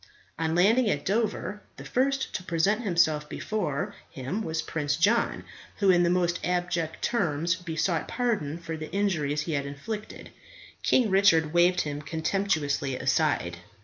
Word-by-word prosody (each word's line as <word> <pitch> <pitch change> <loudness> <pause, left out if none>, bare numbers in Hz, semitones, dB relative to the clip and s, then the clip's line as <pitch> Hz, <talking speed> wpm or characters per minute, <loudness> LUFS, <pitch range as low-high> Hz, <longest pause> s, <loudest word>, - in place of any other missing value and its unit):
On 160 0 0
landing 215 +6 +4
at 145 -6 -1
Dover, 210 0 -1 0.2
the - - -9
first 270 +1 0
to - - -2
present 180 +6 +1
himself 160 -7 +1
before 180 -10 -2 0.2
him 135 +11 -4
was 160 -5 -2
Prince 145 -2 -1
John, 210 +9 +2 0.3
who, 200 -2 +4
in 175 -1 +4
the 175 - +3
most 175 0 +1
abject 175 -2 -1
terms 170 -7 +1
besought 165 -1 -1
pardon 210 - -1
for 165 -1 -6
the 155 0 -7
injuries 155 -8 0
he 165 - -4
had 140 -1 -1
inflicted. 210 +10 -7 0.5
King 235 -6 +3
Richard 165 -5 +4
waved 175 +1 +4
him 145 -1 -4
contemptuously 160 -4 -1
aside. 135 - 0
170 Hz, 145 wpm, -27 LUFS, 150-200 Hz, 0.5 s, landing